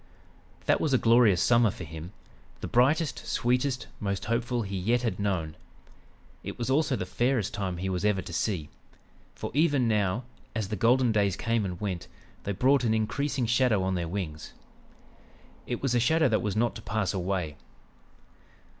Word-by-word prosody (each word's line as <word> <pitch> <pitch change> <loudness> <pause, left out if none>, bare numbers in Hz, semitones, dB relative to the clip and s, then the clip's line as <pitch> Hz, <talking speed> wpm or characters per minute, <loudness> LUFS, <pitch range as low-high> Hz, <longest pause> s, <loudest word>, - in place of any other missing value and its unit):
"That - - +3
was 150 - +1
a - - +6
glorious 115 -6 +4
summer 120 -2 +4
for 95 - -7
him; 80 +2 -8 0.5
the - - -5
brightest, 145 +6 +2
sweetest, 125 +2 0
most 100 -2 -2
hopeful 120 +1 -1
he 100 -1 -5
yet 115 +7 +1
had 110 -6 -1
known. 90 -6 -1 0.9
It - - -6
was 120 +2 -2
also 145 0 +2
the 90 - -3
fairest 120 +2 0
time 95 -3 -3
he 95 +2 -3
was 90 -1 -2
ever 105 -3 +1
to 90 - -8
see; 85 -4 -1 0.7
for - - -5
even 145 -5 +3
now, 105 +1 +1 0.3
as 110 -4 -2
the 110 - -2
golden 120 +4 +3
days 100 -3 +2
came 115 -1 0
and 90 -2 -5
went, 95 -4 -3 0.4
they 100 - -1
brought 130 +6 +3
an 110 -2 +2
increasing 130 +4 -1
shadow 120 -4 +2
on 95 0 0
their 85 -2 -2
wings. 80 -4 -5 1.1
It 120 - -4
was 135 -3 +1
a 120 - +3
shadow 160 +6 +3
that 110 - +2
was 105 -2 -2
not 120 +2 +1
to - - -10
pass 105 -1 -1
away. 90 -5 -2
110 Hz, 175 wpm, -28 LUFS, 95-125 Hz, 1.1 s, a